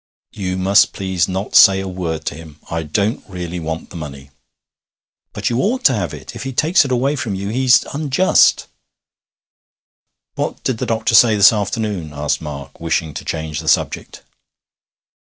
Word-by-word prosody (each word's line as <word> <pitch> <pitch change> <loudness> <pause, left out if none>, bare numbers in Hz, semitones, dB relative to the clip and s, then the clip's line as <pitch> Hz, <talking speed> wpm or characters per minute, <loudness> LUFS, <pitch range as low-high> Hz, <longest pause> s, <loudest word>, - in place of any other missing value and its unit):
'You 95 -2 -4
must 100 +2 +3
please 95 -3 -1
not 95 +2 -4
say 95 0 +7
a 95 - -4
word 85 -4 -4
to - - -2
him. 80 -1 -13
I 85 0 -1
don't 100 +8 -1
really 90 -1 -5
want 80 0 -5
the - - -11
money.' 70 -4 -9 1.0
'But - - -3
you 120 - 0
ought 245 +6 -1
to 135 - +6
have 90 - -2
it. - - -10
If - - -7
he 135 0 -5
takes 160 +8 +3
it 135 - -5
away 130 +4 +1
from 110 -8 -3
you 100 +1 -4
he's 130 +2 +3
unjust.' 150 +5 +3 1.7
'What - - -4
did 125 -4 -2
the - - -3
doctor 115 0 0
say 115 -1 +6
this 100 +1 +6
afternoon?' 100 -6 -3
asked 75 +2 -2
Mark, 70 -3 -8
wishing 80 -1 -2
to - - -7
change 80 -2 -4
the 80 - -8
subject. - - -1
95 Hz, 175 wpm, -18 LUFS, 80-115 Hz, 1.7 s, say